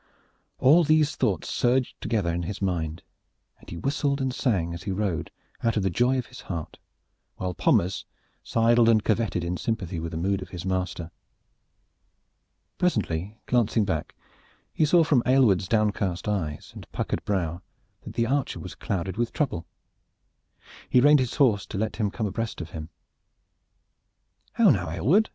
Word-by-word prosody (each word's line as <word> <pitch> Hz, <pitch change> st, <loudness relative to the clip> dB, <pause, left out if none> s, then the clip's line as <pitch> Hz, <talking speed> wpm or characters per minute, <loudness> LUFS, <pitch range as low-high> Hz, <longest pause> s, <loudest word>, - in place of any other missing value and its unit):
All 155 Hz, +7 st, +6 dB
these 155 Hz, -1 st, +3 dB
thoughts 95 Hz, -7 st, 0 dB
surged 125 Hz, +1 st, 0 dB
together 100 Hz, -8 st, 0 dB
in 85 Hz, -, -1 dB
his 90 Hz, +4 st, -5 dB
mind, 85 Hz, -4 st, -2 dB, 0.6 s
and -, -, -15 dB
he 85 Hz, -, -6 dB
whistled 140 Hz, -, 0 dB
and 130 Hz, -1 st, -1 dB
sang, 95 Hz, -11 st, 0 dB
as 85 Hz, -, -7 dB
he 95 Hz, -, -4 dB
rode, 95 Hz, -3 st, -2 dB, 0.3 s
out 115 Hz, -1 st, +1 dB
of 105 Hz, -, +1 dB
the 95 Hz, -, +1 dB
joy 125 Hz, +8 st, +2 dB
of 125 Hz, -, -2 dB
his 125 Hz, -, -12 dB
heart, 85 Hz, -4 st, -6 dB, 0.6 s
while 90 Hz, -1 st, -3 dB
Pommers 90 Hz, +2 st, +1 dB, 0.4 s
sidled 115 Hz, 0 st, +3 dB
and 110 Hz, -2 st, +4 dB
curveted 110 Hz, -5 st, 0 dB
in 85 Hz, +1 st, -2 dB
sympathy 95 Hz, -7 st, -3 dB
with 80 Hz, 0 st, -4 dB
the 80 Hz, -, -4 dB
mood 95 Hz, +3 st, 0 dB
of -, -, -8 dB
his 90 Hz, 0 st, -7 dB
master. 90 Hz, -3 st, -2 dB, 1.7 s
Presently, 105 Hz, -, 0 dB
glancing 115 Hz, -3 st, +2 dB
back, 80 Hz, -6 st, -3 dB, 0.6 s
he 155 Hz, -, +3 dB
saw 170 Hz, +2 st, +5 dB
from 145 Hz, -6 st, +3 dB
Aylward's 120 Hz, -8 st, +4 dB
downcast 100 Hz, -4 st, 0 dB
eyes 85 Hz, -8 st, -3 dB
and -, -, -12 dB
Puckered -, -, -2 dB
brow 85 Hz, -4 st, -1 dB, 0.4 s
that -, -, -9 dB
the 115 Hz, -, +2 dB
archer 135 Hz, +3 st, -1 dB
was -, -, -7 dB
clouded 95 Hz, 0 st, -3 dB
with 120 Hz, 0 st, 0 dB
trouble. 90 Hz, -, -2 dB, 1.2 s
He 125 Hz, -, +5 dB
reined 145 Hz, +3 st, +6 dB
his 130 Hz, -2 st, -1 dB
horse 110 Hz, -8 st, +3 dB
to -, -, -5 dB
let 110 Hz, +2 st, -2 dB
him 105 Hz, -3 st, +1 dB
come 110 Hz, +2 st, -3 dB
abreast 110 Hz, +3 st, -3 dB
of 85 Hz, -2 st, -7 dB
him. 80 Hz, 0 st, -7 dB, 1.6 s
"How -, -, +5 dB
now, -, -, 0 dB
Aylward?" 195 Hz, -, +2 dB
105 Hz, 165 wpm, -26 LUFS, 90-125 Hz, 1.7 s, All